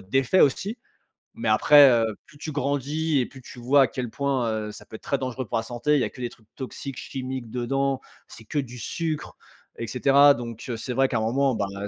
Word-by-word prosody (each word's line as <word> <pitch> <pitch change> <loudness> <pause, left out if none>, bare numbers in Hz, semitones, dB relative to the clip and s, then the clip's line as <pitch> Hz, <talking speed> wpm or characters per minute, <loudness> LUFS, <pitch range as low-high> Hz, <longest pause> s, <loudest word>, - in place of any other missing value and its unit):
d'effets 135 - +1
aussi. 200 - +2 0.6
Mais - - -2
après, 145 -2 +7
heu, 115 -3 +2
plus 145 - -18
tu 155 +1 -6
grandis 145 +2 0
et 125 - +1
plus 135 +1 -13
tu 125 - -12
vois 135 +4 +5
à - - +2
quel 125 +1 -5
point, 135 -3 0 0.2
heu, 105 - -6
ça 105 - -12
peut - - -11
être - - -10
très 140 - 0
dangereux 130 -1 -4
pour 105 - -1
la 115 - -1
santé. 125 +6 0
Il 145 - +2
y - - +2
a - - -1
que 125 - -11
des 120 - -2
trucs 115 -2 -20
toxiques, 135 0 -7
chimiques 130 -3 -5
dedans, 135 +3 -1 0.3
c'est 115 - -13
que 150 - -2
du 125 -3 -5
sucre, 155 +5 -4 0.4
et 115 - -4
cetera. 140 +3 +5
Donc, 115 -1 -7
heu, 115 - -2
c'est 125 - -5
vrai 135 +2 +3
qu'à 120 - -1
un - - 0
moment, 130 +3 +1
bah, 100 - -1 0.2
heu, - - -3
130 Hz, 245 wpm, -25 LUFS, 120-140 Hz, 0.6 s, après